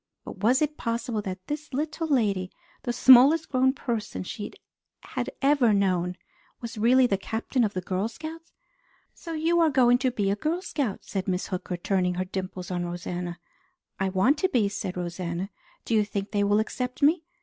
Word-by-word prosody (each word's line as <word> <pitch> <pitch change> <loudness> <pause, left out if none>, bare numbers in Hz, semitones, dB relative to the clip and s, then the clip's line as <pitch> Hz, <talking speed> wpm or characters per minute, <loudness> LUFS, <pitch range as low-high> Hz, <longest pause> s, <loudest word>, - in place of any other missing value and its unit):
But - - -8
was 250 +7 +3
it 300 0 -2
possible 230 -1 -2
that 185 -2 -6
this 300 +1 -5
little 315 +3 -2
lady, 205 -10 +1 0.3
the 245 - -2
smallest 265 +6 +7
grown 260 0 +3
person 235 -7 -4
she 205 +3 -6 0.5
had - - -4
ever 275 -6 +4
known, 180 -2 +1 0.4
was 235 -1 -7
really 245 +4 +5
the 195 -5 +1
Captain 230 +5 -1
of 210 -3 -1
the 185 - -1
Girl 185 +3 -1
Scouts? 320 +7 -9 0.6
"So 330 - -8
you 330 +2 +2
are 330 -1 +5
going 245 -3 +4
to 260 -1 +2
be 205 -5 0
a - - +1
Girl 325 - -2
Scout?" 265 - -2
said 190 -2 -4
Miss 185 -1 -1
Hooker, 180 -1 -3
turning 180 0 0
her 185 +1 -1
dimples 185 -1 -5
on 175 -1 -1
Rosanna. 175 0 -4 0.6
"I 190 0 +1
want 200 +11 +2
to 375 - +2
be," 230 - +2
said 195 -2 -5
Rosanna. 175 +1 -4 0.3
"Do - - -2
you 215 -1 +4
think 200 -1 -4
they 205 -1 +1
will 205 +1 +3
accept 250 +4 -3
me?" 315 +3 +4
220 Hz, 185 wpm, -26 LUFS, 185-265 Hz, 0.6 s, smallest